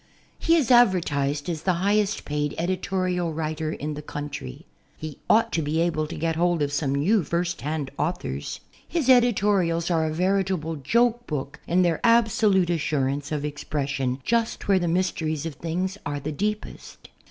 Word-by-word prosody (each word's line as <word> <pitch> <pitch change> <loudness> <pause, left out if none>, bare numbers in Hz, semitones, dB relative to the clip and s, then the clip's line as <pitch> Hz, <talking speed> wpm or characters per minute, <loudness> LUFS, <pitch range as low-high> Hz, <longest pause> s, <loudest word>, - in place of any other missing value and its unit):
He 330 - +3
is 285 -7 +2
advertised 150 - +3
as 165 -3 -3
the 185 +2 +1
highest 205 +3 +1
paid 150 0 -2
editorial 180 0 -1
writer 155 0 -2
in 150 0 -4
the 150 - -6
country. 145 -1 -7 0.3
He 155 -2 -7
ought 225 +1 +4
to 165 - 0
be 155 +2 -1
able 165 -2 0
to 170 - -7
get 165 +1 -1
hold 170 -1 +2
of 145 0 -2
some 140 -1 0
new 185 +8 +2
first 170 +3 -2
hand 150 -2 -3
authors. 110 - -3 0.3
His 315 -7 -1
editorials 200 -9 +3
are 160 -2 +2
a - - -2
veritable 180 -2 0
joke 235 - +1
book 140 -2 -4
in 180 +2 +3
their 170 -3 +1
absolute 220 -6 +4
assurance 145 -3 -1
of 150 -1 -2
expression 140 -3 -2
just 230 - 0
where 195 -2 +4
the 175 - -1
mysteries 165 -3 -1
of 165 - -4
things 180 +6 -3
are 145 0 -3
the 150 +2 -4
deepest. 210 +7 -5
165 Hz, 165 wpm, -25 LUFS, 150-190 Hz, 0.3 s, ought